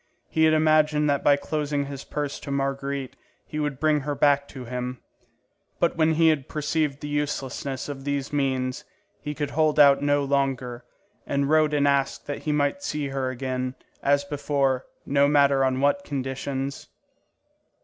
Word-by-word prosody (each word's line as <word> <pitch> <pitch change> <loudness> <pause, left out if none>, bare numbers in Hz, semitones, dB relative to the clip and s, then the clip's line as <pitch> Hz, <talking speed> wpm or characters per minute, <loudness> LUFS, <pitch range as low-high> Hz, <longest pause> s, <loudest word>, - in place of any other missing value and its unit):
He 160 0 +3
had 155 - +4
imagined 155 -1 +3
that 140 - 0
by 145 - +6
closing 145 0 -2
his 140 -1 -7
purse 145 -2 -4
to - - -9
Marguerite, 140 -1 -2 0.3
he 155 - -5
would 145 -3 -2
bring 155 -1 +3
her 145 +1 -3
back 140 0 +3
to 130 -2 -9
him; 125 +1 -4 0.8
but 170 - +2
when 160 -1 +3
he 165 0 +5
had 150 -4 0
perceived 150 -2 -1
the 150 - -5
uselessness 140 -2 -3
of 140 -2 -6
these 140 0 -2
means, 130 -3 -1 0.4
he 150 0 -5
could 145 -1 -3
hold 155 -1 +2
out 140 -1 +7
no 145 0 +2
longer; 135 -3 -1 0.4
he 140 0 0
wrote 155 +1 +3
and 145 -1 +3
asked 140 -1 +1
that 145 - -4
he 155 - +1
might 145 +4 0
see 150 -5 -3
her 135 -1 -2
again, 130 0 -3 0.3
as 140 0 +2
before, 140 -2 -1 0.2
no 140 0 +3
matter 140 -2 +4
on 130 0 +1
what 145 +7 +2
conditions. 135 -1 -4
140 Hz, 170 wpm, -25 LUFS, 135-150 Hz, 0.8 s, out